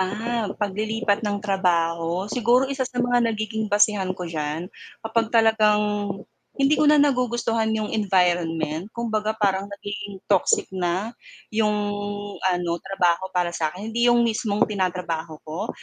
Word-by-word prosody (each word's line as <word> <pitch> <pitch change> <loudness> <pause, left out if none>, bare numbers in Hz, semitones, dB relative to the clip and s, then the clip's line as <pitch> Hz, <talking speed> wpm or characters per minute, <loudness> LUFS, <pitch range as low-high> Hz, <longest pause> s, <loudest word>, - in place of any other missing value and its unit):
Ah, 220 +3 -1
paglilipat 210 +1 -1
ng 205 -2 -1
trabaho, 170 -2 +1
siguro 240 +4 +2
isa 270 0 -4
sa 250 - -14
mga 245 -1 +2
nagiging 220 0 -2
basehan 205 -2 +2
ko 180 - -5
diyan, 160 +1 -4 0.3
kapag 225 0 0
talagang 220 -2 +4 0.8
hindi 275 +2 +3
ko 305 - +5
na 300 - +6
nagugustuhan 240 -5 +1
'yong 215 -1 -3
environment. 175 -5 +1
Kumbaga 220 -2 -1
parang 200 -2 0
nagiging 200 0 -7
toxic 435 -3 +3
na 185 +4 -1 0.4
'yong 215 -1 +2 0.6
ano 180 -2 0
trabaho 190 -1 0
para 175 -1 +1
sa 160 -2 0
'kin, 210 +5 -7
hindi 235 +1 +3
'yong 240 0 +5
mismong 215 -2 +1
tinatrabaho 180 -5 -3
ko. 160 +3 -5
205 Hz, 135 wpm, -24 LUFS, 180-225 Hz, 0.8 s, na